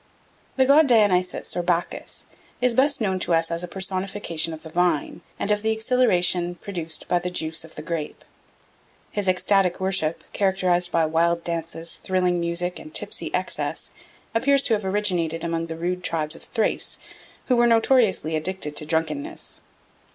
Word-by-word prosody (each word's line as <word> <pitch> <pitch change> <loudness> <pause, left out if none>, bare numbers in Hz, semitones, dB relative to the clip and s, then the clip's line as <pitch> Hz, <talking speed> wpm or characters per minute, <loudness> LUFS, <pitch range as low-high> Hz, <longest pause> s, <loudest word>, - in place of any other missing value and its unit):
The 265 - +4
god 285 +3 +6
Dionysus 205 -7 +2
or 175 - 0
Bacchus 175 0 -2 0.3
is 250 -1 +3
best 270 +2 +2
known 190 -3 0
to 175 -2 +1
us 165 0 +1
as 170 +1 -1
a - - -4
personification 185 -3 -2
of 160 -1 -8
the 160 - -10
vine 175 -3 0 0.2
and 210 - -1
of 210 0 +1
the 220 - 0
exhilaration 185 -7 +2
produced 170 -4 -4
by 175 - +2
the 180 +1 -3
juice 160 -2 -1
of 160 - -13
the 150 - -7
grape. 160 -2 -5 0.9
His 205 -2 -2
ecstatic 185 0 +3
worship, 190 -4 0
characterised 185 -3 +1
by 165 -1 +3
wild 170 +2 +1
dances, 165 0 -4
thrilling 180 -1 0
music, 170 +1 -1
and 310 - -11
tipsy - - -3
excess, - - -2 0.4
appears 275 +4 +3
to 230 - +1
have 210 -2 -1
originated 180 -5 0
among 165 0 -2
the 165 0 -6
rude 180 +2 -2
tribes 155 -2 -1
of - - -12
Thrace, 225 -3 -1 0.5
who 255 - +2
were 240 0 +4
notoriously 225 -8 +3
addicted 155 -2 -2
to 150 - +2
drunkenness. 285 - -2
180 Hz, 165 wpm, -24 LUFS, 165-205 Hz, 0.9 s, god